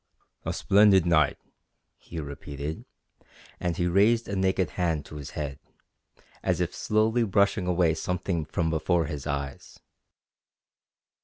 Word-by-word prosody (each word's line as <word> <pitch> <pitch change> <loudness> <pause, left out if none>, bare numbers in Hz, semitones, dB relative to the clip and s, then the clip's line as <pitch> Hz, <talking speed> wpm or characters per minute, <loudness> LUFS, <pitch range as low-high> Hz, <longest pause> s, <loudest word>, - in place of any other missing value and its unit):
"A - - -1
splendid 100 -3 +5
night," 80 -4 +3 0.6
he 85 - -8
repeated, 70 +1 -6 0.7
and 90 -2 -2
he 90 - +1
raised 105 +6 +3
a 100 - -3
naked 95 -2 +1
hand 85 -5 -1
to 75 - -9
his 70 - -7
head, 70 -2 -4 0.8
as - - 0
if - - -1
slowly 110 +2 +1
brushing 100 -2 +2
away 90 -2 +3
something 90 0 -2
from 80 +1 -1
before 80 +1 +1
his 75 -2 -5
eyes. 70 -1 -5
85 Hz, 130 wpm, -27 LUFS, 75-95 Hz, 0.8 s, splendid